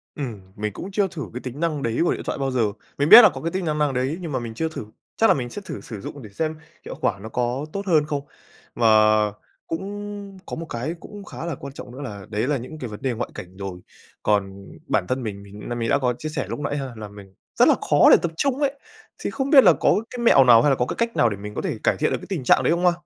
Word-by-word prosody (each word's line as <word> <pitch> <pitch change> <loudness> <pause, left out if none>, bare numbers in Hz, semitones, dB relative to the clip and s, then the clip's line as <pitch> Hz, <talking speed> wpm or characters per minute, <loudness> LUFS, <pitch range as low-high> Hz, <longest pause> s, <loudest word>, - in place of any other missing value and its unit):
Ừm, 120 -9 -5
mình 105 -1 -3
cũng 190 - -7
chưa 200 0 +1
thử 160 -5 -6
cái 125 - -5
tính 130 +3 -6
năng 155 -4 -1
đấy 115 0 -1
của 175 - +2
điện - - -6
thoại - - -2
bao 135 -1 -1
giờ. 125 -2 +1 0.4
Mình 145 +3 +1
biết 240 - +13
là 215 - +8
có - - -8
cái 165 - -2
tính 185 0 -2
năng 155 -1 -1
năng 150 -2 +1
đấy 130 +5 -1
nhưng 165 -4 -5
mà 130 - -1
mình 115 -2 -6
chưa 160 +8 -2
thử, 125 - -7 0.3
chắc 225 - +5
là - - +6
mình 125 -3 -3
sẽ 205 - -7
thử - - -6
sử 110 -5 -8
dụng 140 +7 -8
để 110 - -10
xem 155 +10 -2 0.3
hiệu - - -6
quả 100 -2 0
nó 110 - -8
có 125 +4 -1
tốt 200 0 -4
hơn 155 -4 +4
không. 145 -2 -2 0.5
Mà 115 -1 +3 0.8
cũng 200 +2 -6
có - - -5
một 165 - -6
cái 120 +8 -3
cũng 205 -1 -10
khá 165 - -7
là 170 - -3
quan 140 +1 -9
trọng - - -9
nữa, 130 +3 -9
là 105 -8 -7
đấy 110 +4 -1
là 145 -2 +1
những 140 +6 -8
cái 125 - -4
vấn 105 - -9
đề 130 -2 0
ngoại 120 +1 -4
cảnh 90 +1 -10
rồi, 95 -2 -6 0.4
còn 100 -2 0 0.2
bản 90 - +1
thân 130 0 -1
mình, 100 -2 -5
mình 100 +1 -12
nghĩ - - -10
là 120 - -3
mình 115 -1 -2
đã - - +4
có 125 -2 +1
chia 155 - -5
sẻ 150 - -3
lúc - - -4
nãy 145 0 -2
ha 135 -2 -4
là 110 -1 -7
mình 100 -1 -13 0.3
rất - - +7
là - - +6
khó - - +6
để - - +9
tập 170 - -1
trung 275 -1 0
ấy! 280 -1 +1 0.5
Thì - - -3
không 270 0 -2
biết 275 -4 +8
là - - +7
có - - +2
cái 250 - -7
mẹo 230 -12 +6
nào 120 -2 +7
hay 145 - +3
là 135 - +4
có 125 - 0
cái - - -4
cách 235 0 -1
nào 120 - +4
để 100 - -4
mình 105 +1 -8
có - - -2
thể - - -3
cải - - +2
thiện - - +1
được - - 0
cái - - -11
tình 180 -9 -3
trạng 130 - +4
đấy 130 - +3
không 175 +1 0
ha? 180 - +6
135 Hz, 300 wpm, -23 LUFS, 115-170 Hz, 0.8 s, biết